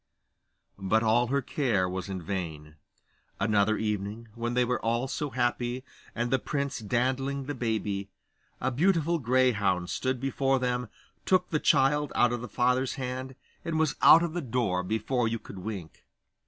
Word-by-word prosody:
But 105 Hz, +4 st, +2 dB
all 115 Hz, +2 st, +3 dB
her 140 Hz, +2 st, 0 dB
care 120 Hz, -10 st, 0 dB
was 95 Hz, +1 st, -4 dB
in 95 Hz, -3 st, -4 dB
vain. 80 Hz, -4 st, -5 dB, 0.6 s
Another 110 Hz, 0 st, +2 dB
evening, 105 Hz, +1 st, -3 dB
when 120 Hz, +1 st, -3 dB
they 125 Hz, 0 st, +3 dB
were 125 Hz, +1 st, -1 dB
all 120 Hz, +3 st, 0 dB
so 145 Hz, +2 st, -3 dB
happy, 120 Hz, 0 st, -1 dB, 0.3 s
and 120 Hz, 0 st, -1 dB
the 130 Hz, -, +3 dB
prince 140 Hz, -1 st, -2 dB
dandling 130 Hz, +5 st, -1 dB
the 145 Hz, -, -3 dB
baby, 105 Hz, -5 st, -2 dB, 0.5 s
a 130 Hz, -, 0 dB
beautiful 165 Hz, +3 st, +2 dB
greyhound 115 Hz, -, +2 dB
stood 130 Hz, -1 st, -1 dB
before 135 Hz, +1 st, +1 dB
them, 125 Hz, -2 st, -1 dB, 0.3 s
took 185 Hz, -1 st, +2 dB
the 155 Hz, -, +1 dB
child 145 Hz, +1 st, +3 dB
out 120 Hz, 0 st, +4 dB
of 120 Hz, -, -3 dB
the 125 Hz, -, -7 dB
father's 125 Hz, +1 st, +1 dB
hand, 130 Hz, 0 st, -5 dB, 0.3 s
and 165 Hz, -1 st, -2 dB
was 155 Hz, -3 st, +1 dB
out 165 Hz, -, +8 dB
of 170 Hz, -2 st, -2 dB
the 175 Hz, -, -2 dB
door 115 Hz, -, 0 dB
before 110 Hz, +5 st, 0 dB
you 115 Hz, +1 st, -1 dB
could 100 Hz, -3 st, -10 dB
wink. 95 Hz, -5 st, -7 dB
120 Hz, 165 wpm, -28 LUFS, 110-135 Hz, 0.6 s, out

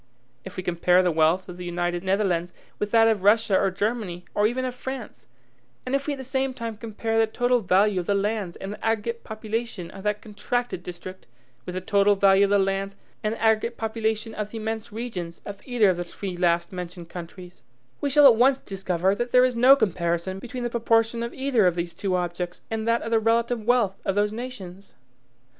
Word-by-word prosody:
If -, -, -10 dB
we 185 Hz, -, -3 dB
compare 180 Hz, +1 st, +3 dB
the 180 Hz, -, +2 dB
wealth 160 Hz, +3 st, +2 dB
of 180 Hz, -1 st, -9 dB
the 180 Hz, -, -7 dB
United 175 Hz, 0 st, -2 dB
Netherlands 185 Hz, -3 st, 0 dB, 0.2 s
with 210 Hz, -, -1 dB
that 225 Hz, +1 st, +5 dB
of 220 Hz, -3 st, +2 dB
Russia 205 Hz, 0 st, +4 dB
or 195 Hz, -, +2 dB
Germany, 195 Hz, -2 st, -3 dB
or 205 Hz, +1 st, +3 dB
even 255 Hz, +3 st, -2 dB
of 255 Hz, -, -3 dB
France, 265 Hz, +1 st, -7 dB, 0.6 s
and 255 Hz, -, -4 dB
if 275 Hz, +1 st, 0 dB
we 295 Hz, -, 0 dB
at -, -, -14 dB
the 265 Hz, -, -7 dB
same 265 Hz, 0 st, -1 dB
time 230 Hz, -2 st, -5 dB
compare 225 Hz, +1 st, -2 dB
the 225 Hz, -, +4 dB
total 245 Hz, +2 st, +1 dB
value 195 Hz, 0 st, +3 dB
of 175 Hz, -, -5 dB
the 200 Hz, -, +2 dB
lands 200 Hz, -3 st, -1 dB
and 195 Hz, +1 st, -6 dB
the -, -, -12 dB
aggregate 225 Hz, +1 st, -1 dB
population 220 Hz, -4 st, -4 dB
of 195 Hz, -, -10 dB
that 210 Hz, +1 st, -1 dB
contracted 225 Hz, 0 st, -3 dB
district 180 Hz, +1 st, -9 dB, 0.4 s
with 180 Hz, -, -5 dB
the 185 Hz, -, -2 dB
total 200 Hz, +2 st, +3 dB
value 195 Hz, 0 st, +5 dB
of -, -, -2 dB
the 205 Hz, -, +4 dB
lands 195 Hz, 0 st, -1 dB, 0.3 s
and 215 Hz, +1 st, 0 dB
the -, -, -12 dB
aggregate 225 Hz, +1 st, +2 dB
population 220 Hz, 0 st, -2 dB
of 210 Hz, -1 st, -4 dB
the 225 Hz, -, -7 dB
immense 220 Hz, 0 st, -4 dB
regions 200 Hz, -7 st, -5 dB
of 200 Hz, -1 st, -8 dB
either 235 Hz, -6 st, +3 dB
of 180 Hz, -, -3 dB
the 175 Hz, -, -2 dB
three 185 Hz, +1 st, -6 dB
last 170 Hz, 0 st, +1 dB
mentioned 180 Hz, -1 st, -7 dB
countries, 175 Hz, +1 st, -10 dB, 0.4 s
we 285 Hz, -, 0 dB
shall 290 Hz, +1 st, +6 dB
at 255 Hz, -4 st, +9 dB
once 260 Hz, +4 st, +4 dB
discover 190 Hz, -4 st, -1 dB
that 240 Hz, +4 st, -2 dB
there 250 Hz, +1 st, +6 dB
is 255 Hz, -1 st, 0 dB
no 255 Hz, +4 st, +7 dB
comparison 185 Hz, -4 st, -1 dB
between 245 Hz, +3 st, -6 dB
the 240 Hz, -, -1 dB
proportion 230 Hz, 0 st, +2 dB
of 235 Hz, 0 st, -3 dB
either 260 Hz, -7 st, +2 dB
of 175 Hz, -, +1 dB
these 170 Hz, -1 st, -3 dB
two 190 Hz, -2 st, -1 dB
objects 175 Hz, 0 st, -3 dB
and 220 Hz, 0 st, -2 dB
that 230 Hz, 0 st, +2 dB
of 230 Hz, -, -5 dB
the 225 Hz, -, +4 dB
relative 230 Hz, 0 st, +1 dB
wealth 225 Hz, -6 st, +2 dB
of 195 Hz, -, -1 dB
those 205 Hz, +1 st, +1 dB
nations. 200 Hz, -6 st, -8 dB
210 Hz, 215 wpm, -25 LUFS, 185-230 Hz, 0.6 s, at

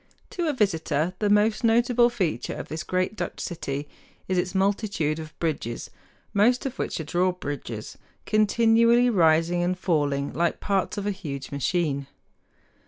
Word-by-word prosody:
To 345 Hz, -2 st, -2 dB
a 305 Hz, -, +1 dB
visitor 165 Hz, -, 0 dB
the 210 Hz, -, +1 dB
most 210 Hz, +2 st, +3 dB
notable 240 Hz, +1 st, +4 dB
feature 195 Hz, -10 st, -2 dB
of -, -, -7 dB
this 155 Hz, +1 st, -4 dB
great 185 Hz, +4 st, -1 dB
Dutch -, -, -4 dB
city 145 Hz, -4 st, -4 dB, 0.4 s
is 185 Hz, -, 0 dB
its 180 Hz, +1 st, -2 dB
multitude 190 Hz, -6 st, 0 dB
of 155 Hz, 0 st, -9 dB
bridges, 145 Hz, -8 st, -3 dB, 0.4 s
most 235 Hz, +6 st, +3 dB
of 270 Hz, -1 st, -4 dB
which -, -, -2 dB
are -, -, -3 dB
drawbridges, 150 Hz, -9 st, -3 dB, 0.3 s
continually 230 Hz, +3 st, +4 dB
rising 165 Hz, -2 st, +3 dB
and 180 Hz, +1 st, 0 dB
falling 145 Hz, -6 st, 0 dB
like 170 Hz, +1 st, 0 dB
parts 195 Hz, 0 st, -1 dB
of 205 Hz, -, -3 dB
a 205 Hz, -, +1 dB
huge 145 Hz, -9 st, -6 dB
machine. 140 Hz, -1 st, -1 dB
180 Hz, 150 wpm, -25 LUFS, 155-215 Hz, 0.4 s, notable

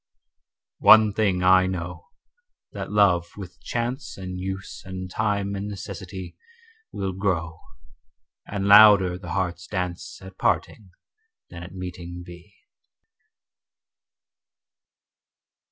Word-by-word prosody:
One 110 Hz, -1 st, +7 dB
thing 100 Hz, -4 st, +1 dB
I 95 Hz, 0 st, +5 dB
know, 90 Hz, -, -5 dB, 0.6 s
that -, -, -6 dB
love 95 Hz, -5 st, +3 dB
with 95 Hz, -3 st, -10 dB
chance 120 Hz, +4 st, -4 dB
And 90 Hz, -1 st, -6 dB
use 95 Hz, +1 st, -6 dB
and 95 Hz, -1 st, -7 dB
time 100 Hz, -2 st, -1 dB
and 100 Hz, +1 st, -4 dB
necessity 95 Hz, -2 st, -8 dB, 0.6 s
Will 95 Hz, -1 st, -3 dB
grow, 85 Hz, -4 st, -2 dB, 0.9 s
and 100 Hz, -1 st, -3 dB
louder 100 Hz, -3 st, +7 dB
the -, -, -7 dB
heart's 90 Hz, -2 st, -2 dB
dance 90 Hz, -3 st, -4 dB
At 95 Hz, 0 st, -13 dB
parting 100 Hz, -4 st, -1 dB, 0.6 s
than 85 Hz, -, -9 dB
at 90 Hz, +2 st, -10 dB
meeting 90 Hz, -1 st, -7 dB
be. 90 Hz, +3 st, -13 dB
95 Hz, 105 wpm, -24 LUFS, 90-100 Hz, 0.9 s, One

